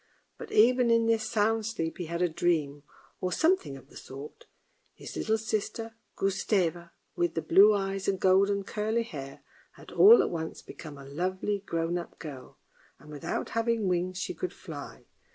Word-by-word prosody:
But - - -8
even 245 +2 +5
in 230 0 +4
this 225 -1 +1
sound 220 0 +1
sleep 165 -8 -3
he 175 - -3
had 170 +2 -1
a - - +4
dream, 155 -4 0 0.4
or 185 - -2
something 320 - +1
of 135 - -16
the - - -17
sort. 145 - -10 0.5
His - - -9
little 220 0 +1
sister, 220 +1 -3 0.2
Gustave, 185 -3 0 0.3
with 175 -1 0
the 165 - 0
blue 205 +6 +6
eyes 195 -1 -2
and 195 -1 0
golden, 195 +2 +3
curly 220 +4 -1
hair, 140 -10 -9 0.3
had - - -14
all 445 +4 +8
at - - -2
once 160 -2 -5
become 150 -3 -10
a 140 - -11
lovely 185 +7 -2
grown 170 -2 -2
up 170 - -10
girl, 140 -5 -10 0.4
and 150 - -15
without 145 -2 -4
having 230 -2 0
wings 180 0 -1
she 365 - -3
could 370 +1 -4
fly. - - -9
190 Hz, 170 wpm, -29 LUFS, 165-220 Hz, 0.5 s, all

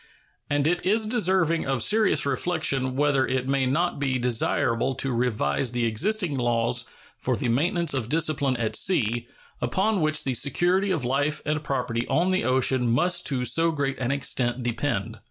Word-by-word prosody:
And 145 -1 0
it 175 +3 0
is 215 +4 +1
deserving 185 - +1
of 135 -4 0
serious 220 -6 +2
reflection 140 -2 0
whether 140 -1 +1
it 130 0 -2
may 135 -1 +1
not 165 +4 -1
be 135 -2 0
desirable 120 +1 0
to 135 +1 -1
revise 120 - -1
the 120 -1 0
existing 165 - 0
laws 120 0 0 0.3
for 125 - -1
the 125 - -2
maintenance 170 - 0
of 125 -4 -2
discipline 150 -4 +1
at 110 -2 -2
sea, 120 - +1 0.3
upon 200 0 0
which 155 0 +1
the 130 - -1
security 175 - +1
of 160 -9 -1
life 145 +4 0
and 150 0 -2
property 125 -4 -2
on 175 +3 +1
the 185 - 0
ocean 130 -1 +2
must 175 +9 +1
to 130 -3 -1
so 165 +5 +4
great 140 -3 -3
an 125 0 -1
extent 130 -3 0
depend. 120 -1 -3
135 Hz, 170 wpm, -25 LUFS, 125-165 Hz, 0.3 s, so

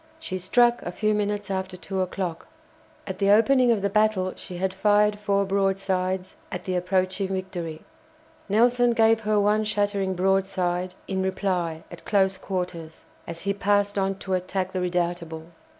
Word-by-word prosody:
She 185 -13 -4
struck 240 +6 +3
a 175 - -5
few 215 +3 0
minutes 205 -1 -1
after 190 -1 -3
two 190 +1 -3
o'clock. 185 -2 -3 0.6
At - - -6
the 200 -1 +2
opening 240 +4 +5
of 210 -4 +1
the - - +3
battle 210 -3 +2
she 180 -2 -8
had 190 +1 -1
fired 210 +1 +3
four 200 -1 +1
broadsides 190 -1 -1
at - - -5
the 185 - -2
approaching 185 +2 0
"Victory." 185 -4 -4 0.7
Nelson 240 +3 +4
gave 225 -1 +4
her 215 -1 +1
one 210 +1 +2
shattering 205 -2 0
broadside 185 -1 0
in 190 -1 -1
reply 185 -4 -1
at - - -11
close 190 -2 +1
quarters, 180 -4 -5 0.2
as 170 0 -7
he 200 +1 0
passed 205 0 +1
on 195 0 0
to 190 0 -5
attack 185 +1 -1
the 185 - -2
"Redoutable." 175 -2 -2
190 Hz, 160 wpm, -25 LUFS, 185-205 Hz, 0.7 s, opening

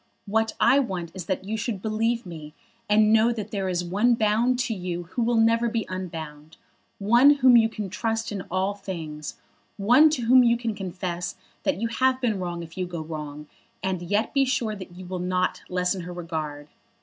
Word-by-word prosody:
What 220 +2 0
I 260 +4 +5
want 185 -10 -3
is 185 -4 -7
that 190 0 -2
you 215 +3 -2
should 220 -2 -3
believe 225 +3 -1
me, 155 -4 -9 0.3
and 215 +1 +5
know 225 +2 +5
that 215 -3 -5
there 195 -2 -2
is 175 -1 -1
one 210 +7 +2
bound 230 +3 +2
to 240 - -1
you 180 -3 -4
who 245 - -2
will 235 0 +2
never 230 +1 +3
be 225 -2 -2
unbound, 160 -4 -7 0.4
one 240 +8 +5
whom 260 -3 +6
you 225 -1 +6
can 215 -2 -5
trust 225 +3 -2
in 200 -2 -3
all 190 +2 0
things, 165 -7 -7 0.4
one 250 +10 +6
to 275 -5 -2
whom 250 +2 +6
you 235 0 +4
can 230 -2 -2
confess 180 -3 -4 0.3
that - - 0
you 230 - 0
have 255 +2 +1
been 225 -6 0
wrong 175 -2 -4
if 165 +2 -10
you 180 - -1
go 170 -2 -5
wrong, 150 -2 -7 0.4
and 190 -2 -1
yet 205 +5 -1
be 275 - +4
sure 235 -5 -1
that 185 -3 -10
you 185 0 -9
will 180 0 -5
not 180 0 -1
lessen 180 +1 0
her 175 +1 -7
regard. 155 -4 -5
200 Hz, 200 wpm, -25 LUFS, 175-230 Hz, 0.4 s, whom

